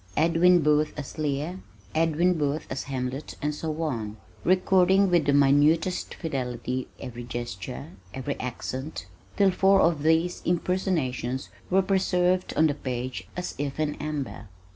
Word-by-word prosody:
"Edwin 170 +2 +5
Booth 150 +1 +3
as 145 +1 -7
Lear," 150 +5 -2 0.3
"Edwin 165 +3 +3
Booth 150 -1 -1
as 130 - -3
Hamlet," 135 +1 -4
and 150 +1 -1
so 155 +1 -3
on, 110 -8 -3 0.3
recording 190 +1 +4
with 170 -4 +3
minutest 145 +5 +3
fidelity 130 -4 -3
every 120 -1 -7
gesture, 95 - -6 0.2
every 135 +4 -3
accent, 130 - -5 0.3
till 195 -2 +5
four 195 +1 +4
of 165 -4 +3
these 160 +3 +2
impersonations 165 - -1 0.2
were 190 +1 +4
preserved 185 -1 +1
on 160 - +5
the 150 - +3
page 125 -8 -4
as 180 - -3
if 145 0 -3
in 150 -1 0
amber. 150 -6 -4
150 Hz, 135 wpm, -26 LUFS, 130-175 Hz, 0.3 s, Edwin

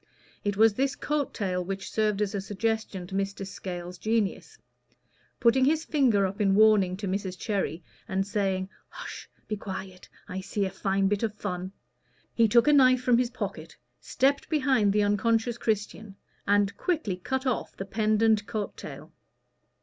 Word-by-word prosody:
It 205 -1 -1
was 220 0 +6
this 270 +5 0
coat 295 -2 -1
tail 180 -3 -2
which 195 +1 -5
served 210 -1 +1
as 200 - -3
a 200 - -2
suggestion 210 -1 -2
to 180 - -11
Mr. 195 0 -2
Scales's 180 -2 -7
genius. 225 - -1 0.8
Putting 245 +2 +4
his 315 +3 +2
finger 245 -10 +3
up 195 +2 -3
in 195 -1 +3
warning 205 -4 +5
to 200 0 -4
Mrs. 190 -1 -3
Cherry, 190 -6 -2 0.2
and 195 -2 0
saying, 195 -2 -1 0.2
"Hush - - -9 0.2
be 215 - -2
quiet 190 -2 -7 0.2
I 190 - -5
see 200 +1 -2
a 190 - -3
fine 195 0 0
bit 205 0 0
of 220 -2 -1
fun" 185 -3 -4 0.6
he 230 -1 +4
took 235 +4 +4
a 295 - +6
knife 255 -3 +5
from 245 -2 +4
his 250 -1 +1
pocket, 250 - -6 0.2
stepped 275 +1 0
behind 260 -9 +3
the 210 +1 +2
unconscious 225 +3 +1
Christian, 210 -1 -2 0.3
and 200 0 +3
quickly 300 - -1
cut 265 +8 -3
off 255 -3 -2
the 195 - -4
pendent 215 +1 +2
coat 210 -1 -3
tail. - - -10
205 Hz, 165 wpm, -27 LUFS, 195-230 Hz, 0.8 s, was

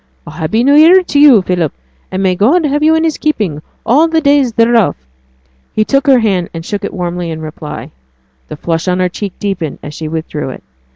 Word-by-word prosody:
'A - - -9
happy 165 +9 -1
new 280 +2 +4
year 335 +5 +6
to 290 - 0
you, 270 -9 +6
Philip, 175 -5 -1 0.4
and 190 +1 -2
may 185 -1 +2
God 270 - +2
have 295 +1 0
you 315 +1 +4
in 320 - +1
his 320 -2 -1
keeping 205 - -1 0.2
all 290 +8 +4
the 325 0 +1
days 285 -4 +2
thereof!' 230 -2 +2 0.8
He 215 - +1
took 275 +4 0
her 270 -2 +6
hand, 195 -7 0
and 165 0 -6
shook 205 +1 -4
it - - -3
warmly 175 -1 -4
in 160 -1 -5
reply. 155 -1 -8 0.6
The - - -8
flush 165 +2 -3
on 180 0 +1
her 180 0 +1
cheek 195 +1 -6
deepened 185 -7 -3
as 145 - -8
she 155 +1 -6
withdrew 155 -3 -4
it. - - -9
200 Hz, 215 wpm, -13 LUFS, -, 0.8 s, year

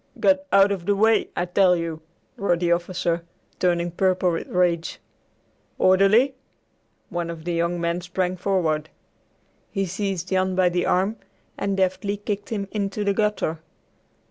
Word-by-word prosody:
"Get 285 0 +3
out 195 +1 +5
of 185 -3 -4
the 205 - +3
way, 220 +2 +3
I 175 - 0
tell 180 0 +4
you!" 165 -2 -4 0.3
roared 195 -7 0
the 175 -1 +1
officer, 170 -1 0 0.4
turning 175 -1 +1
purple 185 0 +1
with 165 - -3
rage; 175 -2 0 0.8
"Orderly!" 195 +8 +4 0.8
One 175 -1 -3
of 165 -1 -7
the 175 - -1
young 170 +1 0
men 170 +1 -1
sprang 180 +1 -2
forward. 170 -5 0 0.8
He 195 -1 -1
seized 185 -1 -3
Jan 185 -1 +1
by 185 -1 +4
the 175 0 -1
arm 195 +5 +1 0.4
and 200 -1 -2
deftly 190 +2 0
kicked 205 0 -4
him 205 -3 -3
into 205 0 -2
the 200 0 +1
gutter. 210 -6 0
185 Hz, 150 wpm, -23 LUFS, 175-200 Hz, 0.8 s, out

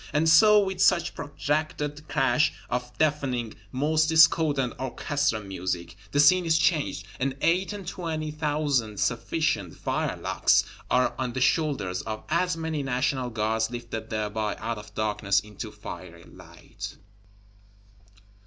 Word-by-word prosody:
And 155 +2 +2
so, 210 +7 +7
with 190 -2 -1
such 175 -3 +3
protracted 150 0 -3
crash 145 0 +2 0.2
of 125 0 -2
deafening, 135 -7 0 0.2
most 155 +4 +1
discordant 155 -5 +4
Orchestra 130 -1 -1
music, 90 -3 -4 0.2
the 145 - +1
Scene 180 +5 +6
is 160 -1 +3
changed; 160 -2 +1
and 135 0 -1
eight 180 +6 +2
and 200 -4 -7
twenty 160 -4 -3
thousand 145 -8 -1
sufficient 115 - -1
firelocks - - +1 0.3
are 125 0 +2
on 125 -2 -2
the 130 - -2
shoulders 130 - +1
of 110 -1 -6
as 175 +2 +1
many 160 -2 -2
National 130 -1 -1
Guards, 110 0 0
lifted 115 -2 -6
thereby 105 -1 -2
out 115 0 -4
of 105 - -13
darkness 105 -2 +1
into 105 -2 -8
fiery - - -9
light. - - -11
140 Hz, 130 wpm, -26 LUFS, 110-155 Hz, 0.3 s, so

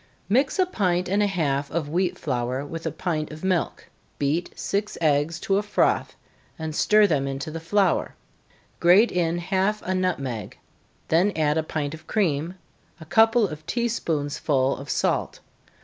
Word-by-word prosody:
_ - - -32 0.2
Mix 265 - +2
a 375 - +4
pint 185 - 0
and 200 +3 +1
a 205 - +3
half 145 -7 -1
of 160 -3 -2
wheat 180 +3 0
flour 130 -2 -2
with 165 +2 -5
a - - -1
pint 160 -2 -3
of 155 +2 -10
milk 185 -2 -1 0.3
beat 150 +5 0
six 205 +1 -2
eggs 155 +1 +1
to 195 - +1
a - - +2
froth, 210 0 +1 0.4
and 160 -1 -4
stir 215 +4 +5
them 145 -8 +1
into 135 +3 -4
the 165 - -5
flour 180 +2 +1 0.6
grate 190 +7 +5
in 170 -1 0
half 190 +4 0
a 185 - -1
nutmeg, 140 - -2 0.5
then 175 +6 +3
add 150 -2 +2
a 160 - +2
pint 155 -2 -3
of 155 -1 -11
cream, 170 -4 0 0.4
a 160 - -10
couple 225 +4 +4
of 155 -2 -8
tea 235 +3 0
spoonsful 145 - 0
of 140 0 -10
salt. - - 0
170 Hz, 170 wpm, -24 LUFS, 150-195 Hz, 0.6 s, stir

